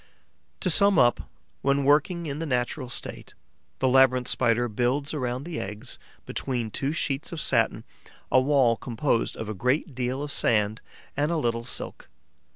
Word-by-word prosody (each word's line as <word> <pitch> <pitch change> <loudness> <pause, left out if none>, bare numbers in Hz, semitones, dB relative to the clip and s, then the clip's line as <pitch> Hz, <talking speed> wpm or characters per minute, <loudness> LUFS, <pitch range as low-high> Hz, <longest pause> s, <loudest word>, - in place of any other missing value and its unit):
To 185 - +1
sum 200 +2 +6
up, 120 -4 +3 0.3
when 140 0 +1
working 155 +5 +2
in 145 -1 -4
the 165 - -3
natural 125 0 -2
state, - - -6 0.4
the 130 - +1
Labyrinth 130 -1 +4
Spider 120 -1 +1
builds 125 +6 -1
around 125 -3 -3
the 165 0 -5
eggs, 105 +6 -6 0.3
between 120 -5 -3
two 135 +5 -1
sheets 150 0 -2
of 170 - -5
satin, - - +1 0.5
a 130 - +5
wall 130 -4 +3
composed 120 0 -1
of 110 - -6
a 110 - -3
great 130 - -1
deal 130 +2 -2
of 145 - -5
sand 110 -3 +1 0.3
and 145 +3 0
a 170 - 0
little 115 -5 -1
silk. - - -4
130 Hz, 160 wpm, -26 LUFS, 120-145 Hz, 0.5 s, sum